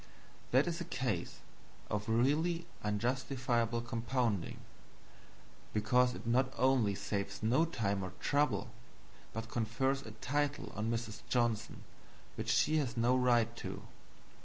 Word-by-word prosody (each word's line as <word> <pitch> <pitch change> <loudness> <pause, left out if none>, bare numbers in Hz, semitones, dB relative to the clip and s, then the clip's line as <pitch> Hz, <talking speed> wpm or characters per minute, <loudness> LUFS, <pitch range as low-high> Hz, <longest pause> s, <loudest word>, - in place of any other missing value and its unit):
That 130 +3 +4
is 170 0 -2
a - - -3
case 120 - -2 0.5
of 105 +1 -2
really 155 +9 +2 0.2
unjustifiable 120 +1 0
compounding; 120 -4 -1 1.2
because 125 +3 +3
it - - -9
not 130 +3 +2
only 125 -6 +3
saves 100 +1 -3
no 130 +9 +4
time 100 -11 -1
or 95 -1 -5
trouble, 140 -9 +1 0.6
but 115 +1 -5
confers 120 +5 0
a 115 - -9
title 145 +5 -1
on 110 +2 -1
Mrs. 115 -2 -3
Johnson 120 -2 0 0.5
which - - -4
she 155 +1 +3
has 130 -5 -1
no 120 +2 +4
right 120 -2 +3
to. - - -6
120 Hz, 125 wpm, -34 LUFS, 110-130 Hz, 1.2 s, That